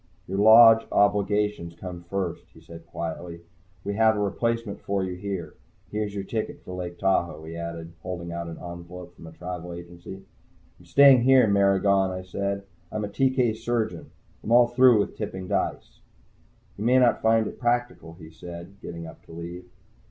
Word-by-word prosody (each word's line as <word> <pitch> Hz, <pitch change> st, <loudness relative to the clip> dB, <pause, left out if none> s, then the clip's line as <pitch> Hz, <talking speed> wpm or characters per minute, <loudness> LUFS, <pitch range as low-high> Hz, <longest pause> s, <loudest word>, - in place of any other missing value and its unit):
"Your 95 Hz, +2 st, -3 dB
Lodge 115 Hz, +1 st, +8 dB
obligations 105 Hz, -3 st, +1 dB
come 90 Hz, 0 st, -8 dB
first," 95 Hz, -4 st, -3 dB
he -, -, -14 dB
said 85 Hz, 0 st, -13 dB
quietly. 85 Hz, +1 st, -6 dB, 0.4 s
"We 100 Hz, -, -3 dB
have 110 Hz, 0 st, +4 dB
a -, -, -1 dB
replacement 115 Hz, +1 st, -2 dB
for 100 Hz, -1 st, -1 dB
you 95 Hz, -1 st, -3 dB
here. 90 Hz, -4 st, -5 dB, 0.4 s
Here's 105 Hz, -1 st, -3 dB
your 100 Hz, -, -3 dB
ticket 110 Hz, +2 st, -4 dB
for 90 Hz, -, -8 dB
Lake 90 Hz, -1 st, -6 dB
Tahoe," 85 Hz, -5 st, 0 dB
he 80 Hz, +1 st, -8 dB
added, 85 Hz, 0 st, -6 dB
holding 85 Hz, -1 st, -6 dB
out 85 Hz, 0 st, -5 dB
an 80 Hz, -, -7 dB
envelope 85 Hz, 0 st, -9 dB
from 85 Hz, -, -12 dB
a -, -, -10 dB
travel 90 Hz, +1 st, -7 dB
agency. 85 Hz, +2 st, -10 dB, 0.6 s
"I'm -, -, -18 dB
staying 140 Hz, -3 st, +7 dB
here, 130 Hz, 0 st, +6 dB
Maragon," 100 Hz, -1 st, +3 dB
I 95 Hz, 0 st, -5 dB
said. 100 Hz, +2 st, -3 dB, 0.3 s
"I'm 110 Hz, -1 st, -2 dB
a -, -, -6 dB
TK 130 Hz, -2 st, +1 dB
surgeon. 115 Hz, -1 st, -3 dB, 0.3 s
I'm 115 Hz, -, -4 dB
all 120 Hz, 0 st, +6 dB
through 120 Hz, -4 st, +5 dB
tipping 95 Hz, -3 st, -6 dB
dice." -, -, -3 dB, 0.8 s
"You 105 Hz, -, -5 dB
may 125 Hz, +3 st, +4 dB
not 125 Hz, -2 st, +3 dB
find 110 Hz, 0 st, +3 dB
it -, -, -7 dB
practical," 120 Hz, -8 st, -1 dB
he 80 Hz, -2 st, -13 dB
said, 85 Hz, +3 st, -11 dB
getting 85 Hz, -1 st, -7 dB
up -, -, -12 dB
to -, -, -14 dB
leave. 85 Hz, +2 st, -8 dB
95 Hz, 175 wpm, -25 LUFS, 85-110 Hz, 0.8 s, Lodge